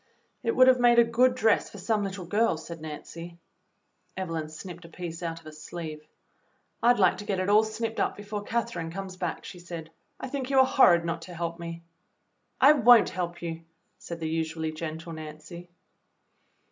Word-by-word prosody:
"It 460 - -1
would 255 - +7
have 255 -1 +6
made 240 -1 +5
a 235 - +9
good 250 +2 +3
dress 220 -4 +2
for - - -11
some 210 +2 0
little 195 -2 -5
girl," 210 0 +2
said 165 0 -9
Nancy. 165 +2 -8 0.8
Evelyn 165 -4 -3
snipped 175 +2 -9
a 165 - -12
piece 165 -1 -7
out 165 -1 -4
of - - -22
a 155 - -8
sleeve. 155 0 -8 0.7
"I'd 240 +1 +5
like 185 -3 +4
to - - -5
get 200 -2 -2
it 185 +1 -1
all 210 +1 +6
snipped 220 +1 -4
up - - 0
before 205 0 -5
Catherine 205 -7 -2
comes 190 +2 -6
back," 175 -2 -4
she 180 - -9
said. 170 -2 -8 0.3
"I - - -5
think 265 0 -4
you 275 - +2
are 265 - +8
horrid 175 -11 +5
not 165 0 -2
to 175 - -8
help 170 0 -4
me." 170 0 -7 0.8
"I 275 - +8
won't 245 -5 +6
help 175 -1 -4
you," 165 -1 -4 0.4
said 170 -1 -7
the 160 - -3
usually 160 0 -2
gentle 160 +1 -6
Nancy. 155 +3 -9
175 Hz, 190 wpm, -27 LUFS, 165-220 Hz, 0.8 s, a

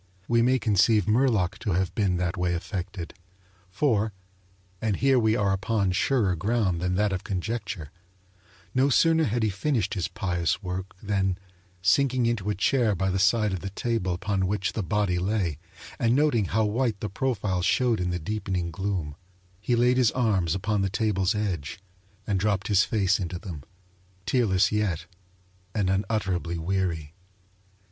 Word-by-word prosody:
We 120 0 +3
may 130 +2 +3
conceive 105 -2 +3
Murlock 110 -5 +2
to 100 - -1
have 95 +1 0
been 95 -4 +1
that 90 0 -1
way 90 -1 0
affected, 90 -1 -5 0.6
for 110 0 +1 0.7
(and 110 -3 0
here 135 +4 +3
we 110 -1 +2
are 100 -4 +1
upon 100 0 0
surer 100 -1 +1
ground 100 -1 0
than 90 0 0
that 105 0 +1
of 90 - -3
conjecture) 95 -5 -4 0.8
no 130 +2 +3
sooner 160 +3 +4
had 115 +1 0
he 110 - +2
finished 110 -2 -1
his 95 -5 -1
pious 90 +1 -1
work 95 +1 -5
than, 95 -3 0 0.5
sinking 125 +6 +3
into 115 -4 -1
a 105 - 0
chair 110 +1 +2
by 95 +1 0
the 95 - 0
side 105 +1 +3
of 95 - -2
the 95 - -5
table 100 -3 -1
upon 95 0 -1
which 100 -1 -1
the 110 - -2
body 100 -2 0
lay, 90 -5 -1 0.4
and 115 +1 +3
noting 140 -7 +2
how 110 +4 +1
white 110 0 0
the 105 - -3
profile 100 -4 -1
showed 115 +4 +2
in 90 0 -1
the 90 - -1
deepening 90 -1 -3
gloom, 90 -4 -3 0.5
he 120 +4 0
laid 125 +2 +3
his 125 -3 +4
arms 100 -9 +1
upon 105 +1 0
the 95 - 0
table's 105 -1 0
edge, 95 -9 -3 0.5
and 100 -2 0
dropped 100 0 0
his 100 -2 +5
face 95 -3 +1
into 90 -1 -3
them, 85 -6 -7 0.6
tearless 100 -6 +2
yet 100 -7 -1 0.7
and 95 -3 +1
unutterably 95 -4 -1
weary. 85 -3 -2
100 Hz, 165 wpm, -26 LUFS, 90-110 Hz, 0.8 s, his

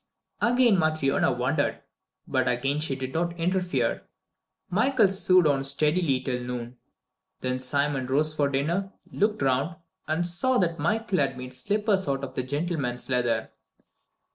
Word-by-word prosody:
Again 240 -3 +4
Matryona 155 -4 +1
wondered, 130 +5 -1 0.4
but - - 0
again 135 +4 0
she 150 -3 -1
did 130 0 -5
not 170 +1 -1
interfere. 180 +1 0 0.7
Michael 220 +2 +3
sewed 185 -2 +3
on 140 -2 +2
steadily 150 +1 +2
till 125 -1 -3
noon. 120 0 -6 0.6
Then 130 0 -1
Simon 140 0 0
rose 150 +4 +2
for 145 -2 +1
dinner, 170 +9 -1 0.2
looked 210 -6 0
around, 135 +5 +1 0.3
and 160 +3 0
saw 215 +10 +2
that 170 -4 0
Michael 205 +4 0
had 140 -2 +1
made 125 0 -7
slippers 205 - 0
out 135 0 -1
of 135 - -5
the - - -1
gentleman's 140 -2 -3
leather. 125 -2 0
150 Hz, 140 wpm, -26 LUFS, 130-180 Hz, 0.7 s, Again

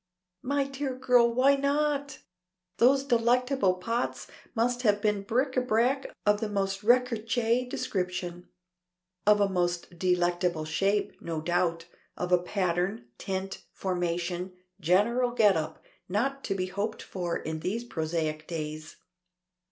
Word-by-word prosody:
"My 280 +2 +1
dear 275 -1 -4
girl, 245 -2 +4
why 260 +4 +4
not? 285 0 0 0.5
Those 270 +3 +5
delectable 245 -4 +2
pots 230 +6 -2 0.3
must 245 +2 +1
have 210 -4 +3
been 210 -1 +1
bric 250 +7 0
à 255 -1 0
brac 250 +5 +2 0.2
of 210 0 +4
the 220 - -2
most 195 -1 -1
recherché 240 +1 +2
description. 180 -4 -3 0.8
Of 210 0 +6
a 200 - +4
most 175 -2 -2
delicate 175 -2 +1
shape, 195 +6 0
no 165 -2 -3
doubt. 170 0 0 0.3
Of 180 0 -3
a 180 -1 +5
pattern, 180 - -1
tint, 190 0 -4
formation, 175 0 -2 0.3
general 235 +8 +2
get 210 -5 +5
up 160 0 -4 0.3
not 270 +8 -1
to 195 - -1
be 185 -1 -1
hoped 200 +4 -3
for 175 -3 -3
in 160 0 -5
these 210 +8 -2
prosaic 155 -6 -3
days." 155 -1 -5
200 Hz, 130 wpm, -28 LUFS, 175-245 Hz, 0.8 s, Of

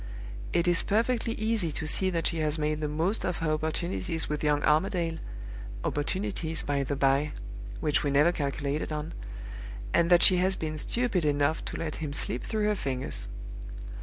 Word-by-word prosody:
It 175 0 +2
is 175 -1 +5
perfectly 230 +2 +1
easy 215 -6 +1
to 155 - -3
see 190 +5 +3
that 170 -3 -1
she 165 - 0
has 155 0 +1
made 155 0 0
the 150 - 0
most 165 +8 0
of 180 - -1
her 165 -2 0
opportunities 160 - -1
with 150 0 -2
young 150 -1 +2
Armadale 165 +1 +2 0.6
(opportunities, 165 0 0
by 140 -1 0
the 140 +1 -1
by, 140 +2 +2 0.5
which 150 -2 +2
we 145 - +1
never 145 +5 +5
calculated 145 -1 -2
on), 150 +1 -3 0.8
and 170 0 +4
that 175 -1 +7
she 185 - +7
has 185 +1 +3
been 155 -2 -3
stupid 230 -2 +1
enough 145 +1 +2
to - - -4
let 160 -2 -3
him 150 -3 -4
slip 125 -3 -2
through 215 -1 -1
her 210 0 +2
fingers. 130 - -3
160 Hz, 175 wpm, -29 LUFS, 150-180 Hz, 0.8 s, that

